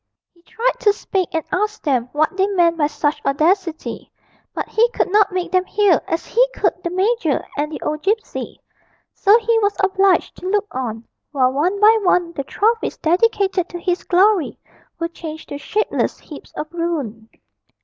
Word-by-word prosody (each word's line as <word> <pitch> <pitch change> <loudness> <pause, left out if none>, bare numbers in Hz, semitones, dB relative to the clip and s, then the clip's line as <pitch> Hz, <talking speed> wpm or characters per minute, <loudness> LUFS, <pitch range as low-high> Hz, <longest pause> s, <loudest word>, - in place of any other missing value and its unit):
He 340 - -27
tried 460 +7 -2
to 415 - +3
speak 380 -3 -2
and 320 - 0
ask 425 +3 -1
them 255 -5 0
what 310 +4 0
they 385 0 +2
meant 350 -4 +2
by 300 -3 +1
such 295 0 -2
audacity, 325 +4 -1 0.4
but - - -4
he 465 +2 +2
could 425 - -1
not 415 -1 +4
make 365 -1 -3
them 370 -1 +2
hear 400 -4 +3
as 330 - -2
he - - +3
could - - +1
the 345 - -3
major 375 - 0
and 300 +1 -2
the - - -5
old 305 0 -2
gipsy; 425 +5 -2 0.5
so 410 +2 +5
he 460 0 +1
was 405 -1 +1
obliged 390 0 +2
to 370 - -5
look 410 +1 +1
on 230 -3 -4 0.2
while 260 -3 +2
one 355 +8 0
by 440 +2 +6
one 360 -3 +2
the 280 - -4
trophies 450 - 0
dedicated 380 +1 +1
to 350 - -7
his 355 +1 -1
glory 375 -2 +2 0.4
were 335 - -2
changed 320 -2 -9
to 285 - -6
shapeless 425 +8 -1
heaps - - -12
of - - -4
ruin. 285 -11 -3
360 Hz, 180 wpm, -20 LUFS, 310-410 Hz, 0.5 s, by